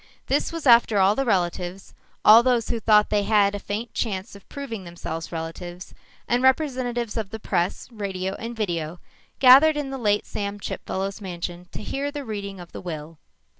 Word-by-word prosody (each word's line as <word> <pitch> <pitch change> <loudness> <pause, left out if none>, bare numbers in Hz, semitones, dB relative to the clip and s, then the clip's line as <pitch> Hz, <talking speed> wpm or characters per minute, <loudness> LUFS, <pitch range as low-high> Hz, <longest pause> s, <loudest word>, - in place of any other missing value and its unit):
This - - 0
was 330 -2 -6
after 235 -3 +6
all 195 +1 +5
the 270 +5 -1
relatives, 180 -2 -1 0.3
all 220 +2 +10
those 240 -2 +1
who 230 - -1
thought 210 -1 +4
they 210 -1 +3
had 205 -1 +3
a 205 - -3
faint 210 +4 -5
chance 195 -4 -3
of 200 - -16
proving 240 -8 -6
themselves 170 -2 -6
relatives, 175 +2 -7 0.3
and 245 +1 +2
representatives 255 -4 +1
of 215 -3 -3
the 220 - -6
press, 180 -4 -1
radio, 195 -3 -3
and 230 +1 -6
video, 175 -6 -3 0.4
gathered 275 +4 +7
in 280 -2 -3
the 270 - -5
late 210 -3 +1
Sam 205 0 -4
Chipfellow's 195 +1 -4
mansion 175 -1 -6
to - - -6
hear 280 +1 -2
the 285 -1 -6
reading 200 -3 -5
of 175 -1 -11
the - - -8
will. 160 -2 -7
205 Hz, 180 wpm, -24 LUFS, 180-240 Hz, 0.4 s, all